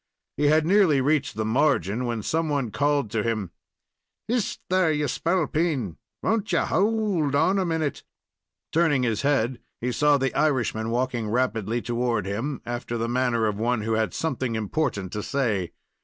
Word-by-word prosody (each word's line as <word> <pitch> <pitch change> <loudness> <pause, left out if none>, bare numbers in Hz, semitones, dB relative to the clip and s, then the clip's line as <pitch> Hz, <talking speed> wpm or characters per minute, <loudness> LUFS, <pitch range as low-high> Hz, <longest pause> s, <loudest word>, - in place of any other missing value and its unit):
He 145 - 0
had 155 +1 +4
nearly 180 -6 +4
reached 140 0 +1
the 110 0 -2
margin, 125 -2 +1
when 115 -3 -2
some 160 +4 0
one 140 -6 -1
called 145 -1 +1
to 115 -1 0
him: 110 -5 -2 0.8
"Hist, 235 -1 -1
there, 185 -3 +3
ye 150 -1 0
spalpeen! 155 - 0 0.3
Won't 220 -4 0
ye 175 - +3
howld 195 -8 +1
on 190 +7 +3
a 190 - +1
minute?" 160 -4 -1 0.7
Turning 155 -6 +2
his 115 -4 0
head, 130 -4 +1 0.2
he 125 +1 -1
saw 150 +2 +3
the 135 -1 -1
Irishman 120 -7 0
walking 120 -2 -1
rapidly 120 -1 0
toward 120 -3 -1
him, 115 +8 -3
after 120 0 -4
the 115 0 -1
manner 120 -2 +1
of 105 -1 -1
one 120 0 +1
who 110 +1 -1
had 110 0 +1
something 130 -7 -2
important 110 - -2
to 105 - -2
say. 110 -9 -1
130 Hz, 165 wpm, -25 LUFS, 115-155 Hz, 0.8 s, had